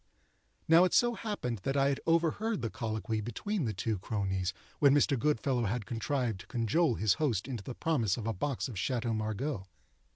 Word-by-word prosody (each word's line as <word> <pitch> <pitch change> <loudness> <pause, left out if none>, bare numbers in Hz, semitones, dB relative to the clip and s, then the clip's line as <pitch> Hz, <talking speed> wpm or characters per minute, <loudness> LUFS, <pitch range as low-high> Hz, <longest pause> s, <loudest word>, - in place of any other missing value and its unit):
Now 165 +2 +7
it 185 - +2
so 240 0 +4
happened 200 - -3
that 135 +9 -1
I 135 0 +4
had 140 - -1
overheard 170 - +1
the 115 - -2
colloquy 110 -2 -2
between 150 - -2
the 110 - 0
two 105 +1 -1
cronies, 95 -2 -1 0.3
when 140 -1 +6
Mr. 145 -1 +3
Goodfellow 130 -2 +1
had 110 +1 -2
contrived 120 -2 -1
to - - -12
cajole 120 +4 +1
his 105 -2 +3
host 120 -8 +1
into 120 -7 -5
the 125 - -6
promise 120 - +1
of 115 - -5
a 115 - 0
box 135 +8 -2
of 115 -8 -6
Chateaux 120 0 -1
Margaux. 110 0 -2
120 Hz, 190 wpm, -31 LUFS, 110-145 Hz, 0.3 s, Now